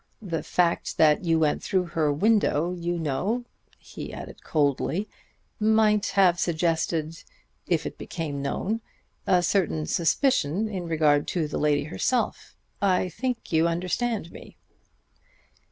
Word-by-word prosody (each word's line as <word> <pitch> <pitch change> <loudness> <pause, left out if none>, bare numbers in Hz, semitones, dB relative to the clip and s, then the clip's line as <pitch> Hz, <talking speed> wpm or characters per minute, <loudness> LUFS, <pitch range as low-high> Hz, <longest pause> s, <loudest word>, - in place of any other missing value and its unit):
The 170 -7 -3
fact 170 +2 0
that 155 +3 +4
you 165 -1 +3
went 155 -2 +1
through 185 -1 0
her 155 -3 +2
window, 175 -1 +2
you 175 0 -2
know," 180 - -1 0.3
he - - -9
added - - -9
coldly, 150 +6 0 0.5
"might 215 -1 +3
have 180 -3 +4
suggested, 165 -1 -1 0.4
if - - +1
it - - -6
became 150 -5 -4
known, 215 +10 -2 0.5
a 180 -2 +4
certain 165 - +1
suspicion 175 - +1
in 185 -5 -5
regard 150 -3 +2
to 165 -4 -1
the 150 - -3
lady 150 -1 +2
herself. 210 - -2 0.3
I 185 -2 +2
think 245 +5 -4
you 160 +1 +4
understand 180 +3 -2
me." - - -13
170 Hz, 130 wpm, -26 LUFS, 155-200 Hz, 0.5 s, that